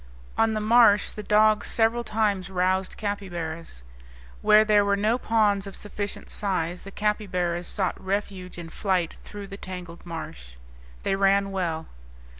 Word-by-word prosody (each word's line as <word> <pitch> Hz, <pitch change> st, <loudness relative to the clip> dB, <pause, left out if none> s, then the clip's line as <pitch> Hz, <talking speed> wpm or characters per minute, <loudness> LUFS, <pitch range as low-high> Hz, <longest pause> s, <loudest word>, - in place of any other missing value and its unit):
On 225 Hz, -1 st, +2 dB
the -, -, 0 dB
marsh 215 Hz, -1 st, +5 dB
the 210 Hz, -, -7 dB
dogs 210 Hz, 0 st, +3 dB
several 230 Hz, +1 st, +2 dB
times 210 Hz, -4 st, 0 dB
roused 185 Hz, 0 st, 0 dB
capybaras. 170 Hz, -, -5 dB, 0.6 s
Where 215 Hz, +1 st, +6 dB
there 210 Hz, -1 st, +5 dB
were 200 Hz, 0 st, +2 dB
no 220 Hz, +4 st, +1 dB
ponds 210 Hz, -4 st, +2 dB
of 195 Hz, -, -8 dB
sufficient 205 Hz, -1 st, -6 dB
size 180 Hz, -4 st, -1 dB
the 195 Hz, -, -9 dB
capybaras 180 Hz, -5 st, -1 dB
sought 190 Hz, -3 st, -2 dB
refuge 190 Hz, -2 st, -3 dB
in 165 Hz, -2 st, -8 dB
flight 185 Hz, -4 st, -1 dB
through 205 Hz, -1 st, -8 dB
the 195 Hz, 0 st, -9 dB
tangled 180 Hz, -3 st, -8 dB
marsh. 65 Hz, -, -8 dB, 0.5 s
They 195 Hz, -, +1 dB
ran 195 Hz, 0 st, +3 dB
well. 170 Hz, -4 st, -2 dB
195 Hz, 145 wpm, -26 LUFS, 180-210 Hz, 0.6 s, Where